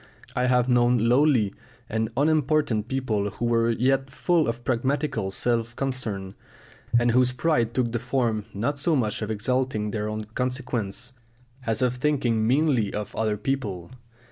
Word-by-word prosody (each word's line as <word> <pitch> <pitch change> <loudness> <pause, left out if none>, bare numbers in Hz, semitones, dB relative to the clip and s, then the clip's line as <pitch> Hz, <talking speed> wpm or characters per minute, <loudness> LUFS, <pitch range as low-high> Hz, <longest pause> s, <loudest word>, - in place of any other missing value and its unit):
I 125 - +1
have 125 -1 +3
known 120 0 +4
lowly 120 -2 +3 0.3
and 110 0 -1
unimportant 150 -6 +2
people 115 -6 -1
who 120 - -4
were 115 0 +2
yet 135 +3 +1
full 165 +3 +1
of 115 +1 -3
pragmatical 130 -3 0
self 115 +3 -1
concern, 110 -8 -3 0.6
and 120 0 +3
whose 125 +1 +3
pride 125 -4 0
took 125 -3 +1
the 120 - -1
form 120 -4 -1
not 125 +9 -2
so 160 +2 +2
much 110 -6 0
of 105 - -3
exalting 110 0 -1
their 105 -1 -2
own 110 0 -3
consequence 125 -3 -3 0.5
as 115 +3 0
of 125 0 +1
thinking 125 -6 +1
meanly 130 -5 +2
of 105 -1 -5
other 110 -1 0
people. 105 -7 -3
120 Hz, 150 wpm, -25 LUFS, 110-130 Hz, 0.6 s, known